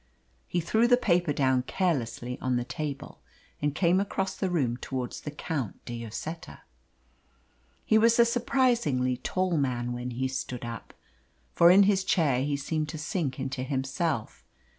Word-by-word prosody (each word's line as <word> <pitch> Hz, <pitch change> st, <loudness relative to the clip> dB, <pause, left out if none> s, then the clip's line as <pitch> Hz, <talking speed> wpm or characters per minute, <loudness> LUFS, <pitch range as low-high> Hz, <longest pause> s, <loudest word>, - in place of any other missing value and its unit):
He 175 Hz, -, -1 dB
threw 220 Hz, +8 st, +2 dB
the 245 Hz, 0 st, +5 dB
paper 175 Hz, -8 st, +2 dB
down 130 Hz, -3 st, +2 dB
carelessly 125 Hz, -6 st, -2 dB
on 130 Hz, -1 st, 0 dB
the 120 Hz, -, 0 dB
table, 140 Hz, +2 st, -6 dB, 0.4 s
and 145 Hz, 0 st, 0 dB
came 180 Hz, 0 st, +3 dB
across 195 Hz, -1 st, -2 dB
the 190 Hz, -, -1 dB
room 130 Hz, -9 st, 0 dB
towards 130 Hz, -1 st, -5 dB
the -, -, -5 dB
Count 145 Hz, -, -4 dB
de 120 Hz, -1 st, -5 dB
Lloseta. 155 Hz, +9 st, -7 dB, 1.2 s
He 220 Hz, -, +4 dB
was 230 Hz, +1 st, +4 dB
a 235 Hz, -, +7 dB
surprisingly 235 Hz, -, +1 dB
tall 185 Hz, +5 st, -1 dB
man 120 Hz, -3 st, -1 dB
when 120 Hz, +1 st, -4 dB
he 125 Hz, +2 st, -2 dB
stood 125 Hz, -2 st, -5 dB
up; 115 Hz, -2 st, -8 dB, 0.6 s
for 170 Hz, -, +6 dB
in 195 Hz, +3 st, +8 dB
his 195 Hz, -1 st, +3 dB
chair 150 Hz, -10 st, +2 dB
he 145 Hz, 0 st, -1 dB
seemed 155 Hz, +2 st, -2 dB
to 155 Hz, -, -5 dB
sink 155 Hz, -3 st, -2 dB
into 135 Hz, 0 st, -3 dB
himself. 135 Hz, -, -2 dB
145 Hz, 160 wpm, -28 LUFS, 125-185 Hz, 1.2 s, in